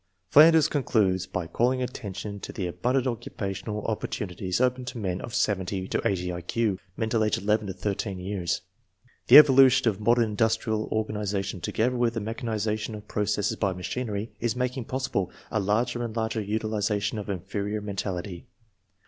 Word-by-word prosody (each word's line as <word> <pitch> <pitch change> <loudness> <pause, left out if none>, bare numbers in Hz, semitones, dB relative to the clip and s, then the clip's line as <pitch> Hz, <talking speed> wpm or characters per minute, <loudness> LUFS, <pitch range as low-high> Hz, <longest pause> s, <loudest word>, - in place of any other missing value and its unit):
Flanders 160 +1 +7
concludes 100 - +1
by 90 -2 -3
calling 125 +9 +1
attention 100 -4 -6
to - - -7
the 95 - -4
abun 125 +8 -1
dant 135 -1 +2
occupational 105 -3 -4
opportunities 95 -3 -3
open 125 0 +1
to 125 -1 -6
men 95 -4 -2
of 120 - -6
70 95 -2 0
to - - 0
80 90 -2 0
I 85 - -5
Q 100 +2 -1 0.2
(mental 110 0 +1
age 105 - +1
11 105 +1 0
to 95 - -4
13 100 +1 -3
years). 90 -1 -2 0.7
The - - +10
evolution 135 -4 +7
of 105 -3 +1
modern 120 +2 +4
industrial 110 0 0
organization 105 -3 -2
together 125 +7 0
with 120 -1 +1
the - - 0
mechanization 110 0 -3
of 105 - -10
processes 105 -1 0
by 100 -3 0
machinery 105 +3 -4
is 115 -1 -1
making 125 0 -2
possible 130 -8 -2 0.2
a 110 - +1
larger 115 +5 0
and 115 -2 -5
larger 110 -1 -1
utilization 105 0 -1
of 105 - -7
inferior 100 +3 -3
men 100 -1 -6
tality. 90 -2 -4
105 Hz, 165 wpm, -27 LUFS, 100-115 Hz, 0.7 s, The